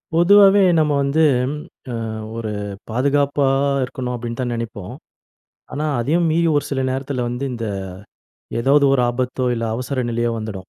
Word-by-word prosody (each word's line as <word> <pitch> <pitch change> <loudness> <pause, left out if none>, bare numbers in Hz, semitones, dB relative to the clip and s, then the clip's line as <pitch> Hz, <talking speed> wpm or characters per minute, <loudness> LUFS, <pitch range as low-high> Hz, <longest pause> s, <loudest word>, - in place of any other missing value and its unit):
பொதுவாவே 200 +3 +6 0.2
நம்ம 155 -1 +2
வந்து 140 +3 +2 0.8
அ 115 - -4 0.3
ஒரு 110 -2 -4 0.4
"பாதுகாப்பா 140 +3 +1 0.4
இருக்கணும்." 125 -1 -4
அப்டின்னு 115 0 -6
தான் 125 -1 -2
நெனைப்போம். 115 -3 -6 0.8
ஆனா, 150 +2 -2
அதையும் 165 +8 +1
மீறி 165 +1 +2
ஒரு 145 - -1
சில 135 -2 -1
நேரத்தில 130 -1 -3
வந்து 125 +3 -4
இந்த 115 -1 -4 1.0
ஏதாவது 140 +4 +4
ஒரு 135 -2 +3
ஆபத்தோ 125 +1 -2
இல்ல 115 -1 -3
அவசர 130 +1 -3
நிலையோ 120 0 0
வந்துடும். 100 -4 -7
130 Hz, 140 wpm, -20 LUFS, 120-145 Hz, 1.0 s, பொதுவாவே